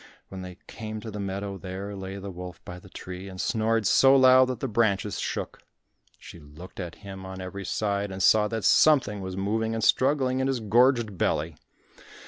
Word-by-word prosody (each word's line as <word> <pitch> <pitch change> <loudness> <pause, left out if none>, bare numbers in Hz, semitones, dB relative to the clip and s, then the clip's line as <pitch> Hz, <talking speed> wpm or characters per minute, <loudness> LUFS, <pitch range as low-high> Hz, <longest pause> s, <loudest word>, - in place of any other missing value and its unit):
When 95 -1 -8
they 90 0 -9
came 110 -1 -7
to 110 - -7
the 105 - -6
meadow, 100 0 -4
there 95 +2 -6
lay 95 0 -6
the 100 0 -7
wolf 90 0 -9
by 90 0 -8
the 95 - -16
tree 90 +1 -8
and 95 -1 -10
snored 110 +1 0
so 135 +7 +6
loud 130 -1 +7
that 125 -3 -4
the 135 - -2
branches 105 -3 0
shook. - - -4 0.6
She 85 - -12
looked 80 +6 -13
at 85 -3 -6
him 95 -1 -8
on 95 0 -8
every 95 +1 -7
side 100 0 -1
and 95 0 -3
saw 105 -1 +5
that 110 0 -4
something 130 -10 +4
was 95 0 -6
moving 110 +3 -1
and 110 - -3
struggling 130 0 +2
in 130 - +1
his 135 -2 0
gorged 115 -2 +2
belly. 80 +1 0
100 Hz, 195 wpm, -26 LUFS, 95-115 Hz, 0.6 s, loud